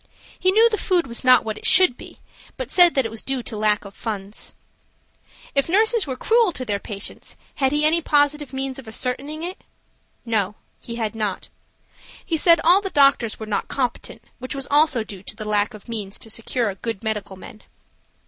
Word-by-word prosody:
He 370 Hz, -, +2 dB
knew 445 Hz, +4 st, +6 dB
the 440 Hz, -2 st, -1 dB
food 360 Hz, -3 st, +1 dB
was 235 Hz, 0 st, -5 dB
not 255 Hz, -2 st, +6 dB
what 215 Hz, -1 st, -4 dB
it -, -, -11 dB
should 365 Hz, -10 st, +6 dB
be, -, -, -13 dB, 0.4 s
but -, -, -5 dB
said 350 Hz, -4 st, +5 dB
it 235 Hz, -5 st, +1 dB
was 225 Hz, -, -5 dB
due 265 Hz, -2 st, -3 dB
to -, -, -5 dB
the 210 Hz, -, -5 dB
lack 210 Hz, -1 st, +1 dB
of 200 Hz, -, -10 dB
funds. 205 Hz, -2 st, -6 dB, 1.0 s
If 275 Hz, +2 st, +1 dB
nurses 435 Hz, +1 st, +3 dB
were 260 Hz, -, -3 dB
cruel 450 Hz, -, +3 dB
to 255 Hz, -, -4 dB
their 205 Hz, -3 st, -1 dB
patients, 200 Hz, -1 st, -8 dB, 0.2 s
had 265 Hz, -2 st, +2 dB
he 295 Hz, +1 st, +1 dB
any 330 Hz, +2 st, +3 dB
positive 295 Hz, -2 st, +1 dB
means 265 Hz, 0 st, -4 dB
of 255 Hz, -, -12 dB
ascertaining 265 Hz, +7 st, -3 dB
it? 360 Hz, +2 st, -6 dB, 0.6 s
No, 210 Hz, -3 st, 0 dB, 0.2 s
he 235 Hz, -, -8 dB
had 225 Hz, -2 st, -2 dB
not. 210 Hz, -4 st, -3 dB, 0.8 s
He 335 Hz, -, -1 dB
said 335 Hz, +1 st, +5 dB
all 360 Hz, +4 st, +5 dB
the 390 Hz, -, -4 dB
doctors 275 Hz, -, +3 dB
were 220 Hz, -, -5 dB
not 210 Hz, -1 st, -2 dB
competent, 255 Hz, -3 st, -3 dB, 0.2 s
which 255 Hz, +2 st, -6 dB
was 275 Hz, -1 st, -4 dB
also 290 Hz, -5 st, +3 dB
due 200 Hz, -3 st, -10 dB
to 205 Hz, -, -9 dB
the 215 Hz, 0 st, -7 dB
lack 210 Hz, +1 st, 0 dB
of 210 Hz, -, -14 dB
means 210 Hz, -4 st, -5 dB
to 225 Hz, -, -9 dB
secure 230 Hz, -1 st, -2 dB
good 210 Hz, +1 st, -6 dB
medical 210 Hz, -3 st, -3 dB
men. 200 Hz, +3 st, -12 dB
250 Hz, 200 wpm, -22 LUFS, 215-305 Hz, 1.0 s, knew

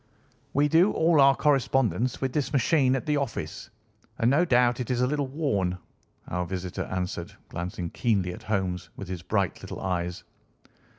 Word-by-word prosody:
"We 145 Hz, +2 st, +3 dB
do 165 Hz, +7 st, +4 dB
all 160 Hz, -2 st, +4 dB
our 135 Hz, 0 st, +6 dB
correspondence 135 Hz, -4 st, +1 dB
with 130 Hz, -1 st, -1 dB
this 145 Hz, -3 st, -1 dB
machine 135 Hz, -1 st, +3 dB
at 135 Hz, -, -3 dB
the 150 Hz, -2 st, +1 dB
office, 140 Hz, -1 st, -4 dB, 0.5 s
and 115 Hz, +2 st, +3 dB
no 160 Hz, +6 st, +4 dB
doubt 125 Hz, -4 st, +3 dB
it 125 Hz, -, -4 dB
is 125 Hz, -1 st, 0 dB
a -, -, +4 dB
little 145 Hz, +1 st, -1 dB
worn," 115 Hz, -, -1 dB, 0.5 s
our 90 Hz, 0 st, -2 dB
visitor 95 Hz, +1 st, -4 dB
answered, 90 Hz, -2 st, -4 dB, 0.2 s
glancing 85 Hz, 0 st, -4 dB
keenly 100 Hz, -6 st, 0 dB
at -, -, -10 dB
Holmes 95 Hz, -4 st, -2 dB
with 100 Hz, -, -7 dB
his 90 Hz, -2 st, -4 dB
bright 100 Hz, 0 st, -1 dB
little -, -, -7 dB
eyes. 90 Hz, -2 st, -2 dB
120 Hz, 170 wpm, -27 LUFS, 90-140 Hz, 0.5 s, our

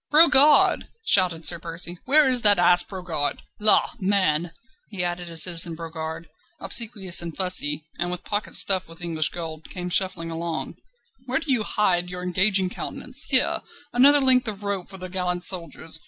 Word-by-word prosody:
"Brogard!" 295 Hz, -1 st, +5 dB, 0.2 s
shouted 175 Hz, -4 st, +2 dB
Sir -, -, +2 dB
Percy. 170 Hz, +1 st, -5 dB
"Where 295 Hz, +2 st, +6 dB
is 255 Hz, -2 st, +3 dB
that 205 Hz, -2 st, +5 dB
ass 175 Hz, 0 st, +5 dB
Brogard? 180 Hz, -6 st, -5 dB, 0.2 s
La! 215 Hz, 0 st, +2 dB
man," 185 Hz, -5 st, -1 dB, 0.4 s
he 195 Hz, -4 st, -4 dB
added 175 Hz, 0 st, -5 dB
as 165 Hz, -2 st, +6 dB
Citizen 170 Hz, -2 st, +1 dB
Brogard, 160 Hz, 0 st, -8 dB, 0.3 s
obsequious 195 Hz, -4 st, -1 dB
and 170 Hz, -2 st, -9 dB
fussy, 155 Hz, -5 st, -1 dB
and 175 Hz, +1 st, -2 dB
with 180 Hz, +1 st, -6 dB
pockets 205 Hz, 0 st, -1 dB
stuffed 190 Hz, -2 st, +2 dB
with 165 Hz, +1 st, -12 dB
English 160 Hz, -3 st, -2 dB
gold, 160 Hz, -2 st, -8 dB
came 180 Hz, -1 st, -8 dB
shuffling 180 Hz, -3 st, -1 dB
along, 165 Hz, 0 st, -5 dB, 0.5 s
"where 255 Hz, +1 st, -1 dB
do 320 Hz, -3 st, -4 dB
you 245 Hz, -4 st, +1 dB
hide 180 Hz, -5 st, -1 dB
your 180 Hz, 0 st, -7 dB
engaging 190 Hz, +2 st, +1 dB
countenance? -, -, -4 dB
Here! -, -, +3 dB, 0.3 s
another 280 Hz, +4 st, +5 dB
length 255 Hz, -2 st, +4 dB
of 210 Hz, -1 st, -5 dB
rope 200 Hz, -3 st, -4 dB
for 195 Hz, -, -11 dB
the 185 Hz, 0 st, -8 dB
gallant 180 Hz, -1 st, -3 dB
soldiers. 165 Hz, -3 st, -1 dB
180 Hz, 170 wpm, -22 LUFS, 170-205 Hz, 0.5 s, Where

